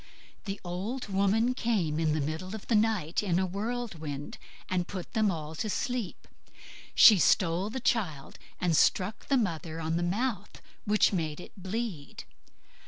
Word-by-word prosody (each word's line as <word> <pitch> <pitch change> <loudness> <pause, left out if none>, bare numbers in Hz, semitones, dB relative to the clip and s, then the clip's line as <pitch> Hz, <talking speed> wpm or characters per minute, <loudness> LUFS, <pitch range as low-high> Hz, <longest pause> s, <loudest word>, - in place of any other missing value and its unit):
The 200 -1 -4
old 200 +8 -4
woman 200 +5 +2
came 195 -11 0
in 155 -2 +2
the 155 - 0
middle 185 +7 -4
of 220 - -9
the - - -1
night 210 -7 +1
in 185 -5 0
a 190 - +2
whirlwind, 185 - -4 0.3
and 180 -1 -1
put 185 -2 -7
them 215 -3 +3
all 160 -3 -4
to 215 +7 -3
sleep. 240 -2 -3 0.7
She 210 -4 +9
stole 180 +3 +3
the 260 - -4
child, 185 - -1 0.2
and 175 -2 +1
struck 190 +6 +2
the 275 - +3
mother 165 -7 -2
on 160 +1 -1
the - - -1
mouth, 205 +4 -2 0.3
which 210 0 +3
made 160 -4 -2
it - - -10
bleed. 190 -5 -5
190 Hz, 160 wpm, -29 LUFS, 165-220 Hz, 0.7 s, She